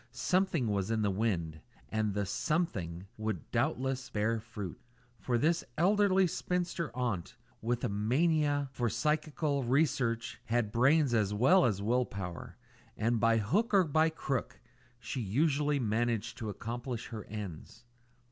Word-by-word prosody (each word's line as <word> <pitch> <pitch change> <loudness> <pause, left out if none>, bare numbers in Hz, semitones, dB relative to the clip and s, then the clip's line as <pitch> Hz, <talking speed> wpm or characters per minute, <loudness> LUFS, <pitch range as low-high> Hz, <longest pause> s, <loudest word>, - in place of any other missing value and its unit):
Something 180 +1 +1
was 100 -1 0
in 110 -1 +1
the 100 - +2
wind, 85 -7 -1 0.3
and 110 -2 -1
the 100 -1 0
"something" 95 - -2
would 110 -6 -4
doubtless 130 0 -1
bear 110 +2 0
fruit; 105 -5 -7 0.4
for 120 -2 0
this 165 +6 +2
elderly 195 +2 +4
spinster 175 -1 -2
aunt, 115 -9 -2 0.3
with 120 +1 -1
a - - +2
mania 145 +7 +1
for 120 -3 -1
psychical 150 0 0
research, 125 -3 0
had 115 -2 0
brains 135 +3 +4
as 105 -3 +2
well 175 - +5
as 100 -4 0
will 125 +4 +2
power, 90 -4 -7 0.4
and 115 +1 +1
by 115 +1 +4
hook 200 - +1
or 190 - +6
by 155 0 +3
crook 140 -5 -3 0.4
she 125 +1 -4
usually 145 +7 +1
managed 115 -1 0
to 110 - -3
accomplish 120 +4 -5
her 110 -3 -6
ends. 105 +2 -8
120 Hz, 140 wpm, -32 LUFS, 105-150 Hz, 0.4 s, or